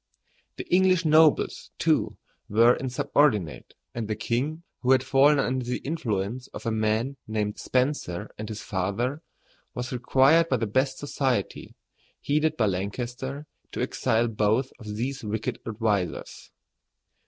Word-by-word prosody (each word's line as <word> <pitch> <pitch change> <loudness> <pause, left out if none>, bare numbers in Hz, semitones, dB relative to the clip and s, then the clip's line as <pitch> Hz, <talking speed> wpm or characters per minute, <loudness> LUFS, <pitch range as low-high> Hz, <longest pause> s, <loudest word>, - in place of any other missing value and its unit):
The - - -6
English 185 -1 +4
nobles, 155 0 +3
too, - - +1 0.3
were 115 +4 +5
insubordinate, 130 - 0 0.2
and 115 -2 -4
the 110 - -2
king, 135 +9 -2 0.2
who 130 +1 +3
had 130 -1 +3
fallen 140 +3 +4
under 130 -1 0
the 125 +1 -2
influence 125 -5 -3
of - - -8
a 115 - 0
man 110 +5 0
named 105 -1 -2
Spencer 125 -9 -1
and 110 +1 -7
his 110 -1 -6
father, 105 - -2 0.5
was 125 +1 -4
required 135 +7 +4
by 130 - +2
the 115 - -1
best 130 +5 0
society, 135 -7 -2 0.5
headed 155 +2 +1
by 110 - +3
Lancaster, 125 +9 -3 0.3
to - - -3
exile 115 +1 +1
both 110 +4 +1
of 105 -3 -7
these 130 +4 -3
wicked 110 +1 -3
advisers. 105 -4 -2
125 Hz, 135 wpm, -26 LUFS, 110-140 Hz, 0.5 s, were